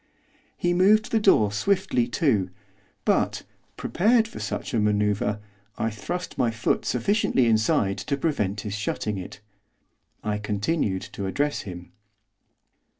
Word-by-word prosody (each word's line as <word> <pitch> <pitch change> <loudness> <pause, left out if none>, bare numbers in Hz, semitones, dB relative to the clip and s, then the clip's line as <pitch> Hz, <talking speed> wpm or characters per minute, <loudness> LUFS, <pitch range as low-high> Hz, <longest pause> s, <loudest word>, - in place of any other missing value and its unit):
He 175 0 +1
moved 205 +4 +4
the 225 - +3
door 110 - +4
swiftly 125 - +1
to; 110 - +1 0.6
but, - - +1 0.3
prepared 220 +5 +2
for 230 - -9
such - - -4
a 115 - +2
manoeuvre, 105 0 +1 0.4
I 115 - -1
thrust 175 - -5
my 120 - +3
foot 110 0 -1
sufficiently 130 - +2
inside 110 -3 +2
to 120 +8 -2
prevent 105 - -1
his 105 -2 -5
shutting 105 0 -2
it. 95 +2 -9 0.8
I 105 -1 -1
continued 105 - -1
to 100 - -4
address 145 +9 -1
him. 90 -1 -9
110 Hz, 130 wpm, -25 LUFS, 105-170 Hz, 0.8 s, moved